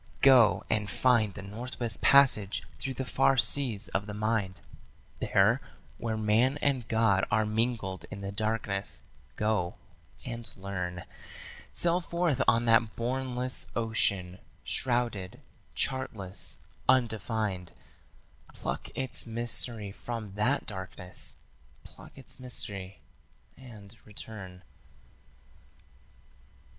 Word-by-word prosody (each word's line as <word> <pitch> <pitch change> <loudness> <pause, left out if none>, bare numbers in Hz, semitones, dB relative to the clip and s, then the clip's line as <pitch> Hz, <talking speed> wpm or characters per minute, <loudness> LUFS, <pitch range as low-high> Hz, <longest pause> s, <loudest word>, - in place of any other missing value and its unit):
Go 130 -6 +7
and 105 -2 0
find 115 -6 +3
the 95 - -7
Northwest 115 +2 -2
Passage 125 -8 +5 0.2
through 135 -1 -3
the 130 - -3
far 135 - +3
seas 125 -5 +3
of 100 - -1
the 105 - -5
mind, 105 -4 0 0.6
There, 105 +7 +3 0.4
where 110 -2 -2
man 110 +6 +3
and 130 -6 +1
God 110 -4 +3
are 110 0 +2
mingled 110 -3 -1
in 100 - -7
the 100 0 -4
darkness, 105 -2 -2 0.3
go 105 -5 0 0.5
and 115 -1 -5
learn. 90 -2 -4 0.7
Sail 175 +1 +2
forth 170 -6 0
on 115 0 +4
that 115 -1 +4
bournless 125 +1 -1
ocean, 100 -5 0 0.2
shrouded, 120 -7 -1 0.4
chartless, 105 -8 -2 0.3
undefined: 110 -7 +1 0.8
Pluck - - -4
its 130 -2 0
mystery 115 -2 -1
from 110 -1 -6
that 120 +8 +1
darkness; 90 - -3 0.5
pluck - - -15
its 135 +1 -5
mystery 100 -6 -4 0.5
and 115 -5 -12
return. 95 -3 -8
110 Hz, 105 wpm, -30 LUFS, 100-125 Hz, 0.8 s, Go